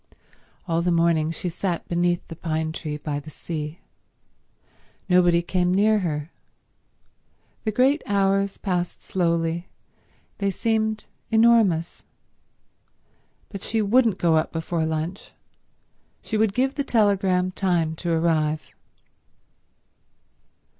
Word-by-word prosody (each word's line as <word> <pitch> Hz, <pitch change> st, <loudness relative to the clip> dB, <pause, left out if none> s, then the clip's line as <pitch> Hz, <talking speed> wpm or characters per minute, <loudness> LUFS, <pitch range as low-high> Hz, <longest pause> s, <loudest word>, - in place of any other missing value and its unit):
All 165 Hz, -1 st, +1 dB
the 175 Hz, -, 0 dB
morning 165 Hz, -2 st, +2 dB
she 165 Hz, +2 st, -4 dB
sat 175 Hz, 0 st, -3 dB
beneath 175 Hz, 0 st, 0 dB
the 165 Hz, -, -8 dB
pine 160 Hz, -1 st, -2 dB
tree 155 Hz, -2 st, -5 dB
by 145 Hz, -1 st, -3 dB
the 150 Hz, +2 st, -11 dB
sea. 155 Hz, +1 st, -6 dB, 1.3 s
Nobody 175 Hz, -2 st, +4 dB
came 180 Hz, 0 st, +1 dB
near 210 Hz, +3 st, +3 dB
her. 155 Hz, -3 st, -3 dB, 1.3 s
The 215 Hz, -, +1 dB
great 265 Hz, +7 st, +3 dB
hours 195 Hz, 0 st, +1 dB
passed 180 Hz, -3 st, -3 dB
slowly; 170 Hz, -1 st, -1 dB, 0.7 s
they 200 Hz, -1 st, +1 dB
seemed 220 Hz, +1 st, -1 dB, 0.2 s
enormous. 220 Hz, -7 st, +3 dB, 1.5 s
But 195 Hz, -2 st, -7 dB
she 220 Hz, +1 st, -1 dB
wouldn't 225 Hz, -1 st, +3 dB
go 165 Hz, -3 st, +3 dB
up 155 Hz, -, 0 dB
before 165 Hz, 0 st, -2 dB
lunch, 160 Hz, +4 st, -4 dB, 0.9 s
she 220 Hz, -, -4 dB
would 215 Hz, -2 st, +2 dB
give 265 Hz, +2 st, +1 dB
the 285 Hz, -, -2 dB
telegram 195 Hz, -6 st, +2 dB
time 175 Hz, -4 st, 0 dB
to 170 Hz, 0 st, -2 dB
arrive. 155 Hz, -3 st, +1 dB
175 Hz, 115 wpm, -24 LUFS, 165-200 Hz, 1.5 s, Nobody